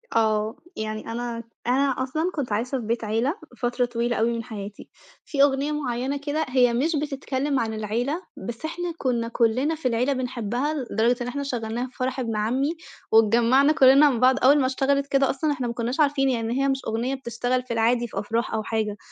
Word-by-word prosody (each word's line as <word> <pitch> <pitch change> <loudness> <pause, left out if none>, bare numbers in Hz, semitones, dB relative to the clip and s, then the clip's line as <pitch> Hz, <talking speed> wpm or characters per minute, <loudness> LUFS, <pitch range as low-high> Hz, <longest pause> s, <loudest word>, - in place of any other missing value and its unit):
آه. 215 -1 +2 0.2
يعني 215 +1 -4
أنا 235 0 -4 0.2
أنا 270 +3 +3
أصلًا 315 +7 -1
كنت 275 -7 -3
عايشة 245 +6 -1
في 235 - -6
بيت 230 +1 -1
عيلة 225 - 0 0.3
فترة 245 0 +1
طويلة 240 0 -1
أوي 230 +2 +1
من 230 -1 -3
حياتي. 210 -3 -8 0.4
في 280 -3 +2
أغنية 280 +1 +2
معيّنة 270 -2 -2
كده 295 +2 -2
هي 250 -2 +4
مش 300 +8 +1
بتتكلّم 280 -1 -1
عن 225 -1 -1
العيلة، 235 - -2 0.3
بس 235 +5 -5
إحنا 350 +2 -3
كُنّا 240 -5 -1
كُلّنا 245 +6 +1
في 305 -4 -2
العيلة 250 +3 +1
بنحبّها 250 +2 -2 0.2
لدرجة 230 +3 +2
إن 245 - -2
إحنا 280 +3 -3
شغّلناها 240 -2 -3
في 255 - -21
فرح 255 0 -2
ابن 230 -3 -2
عمّي، 245 +7 0 0.4
واتجمّعنا 235 +6 +5
كُلّنا 275 +1 +7
مع 255 - 0
بعض، 255 +2 +5
أول 280 +3 +6
ما 265 - +2
اشتغلت 275 +2 +1
كده 275 -1 +2
أصلًا 300 +3 0
إحنا 260 -4 -2
ما 235 - -3
كُنّاش 240 +4 -3
عارفين 280 -2 +3
يعني 235 +1 -1
هي - - +2
مش 270 -1 +1
أغنية 235 +4 -1
بتشتغل 245 0 -2
في 250 -1 -5
العادي 235 +1 +2
في 200 - -4
أفراح 225 +3 -2
أو 220 - -1
حاجة، 215 -2 -2
250 Hz, 200 wpm, -24 LUFS, 230-275 Hz, 0.4 s, كُلّنا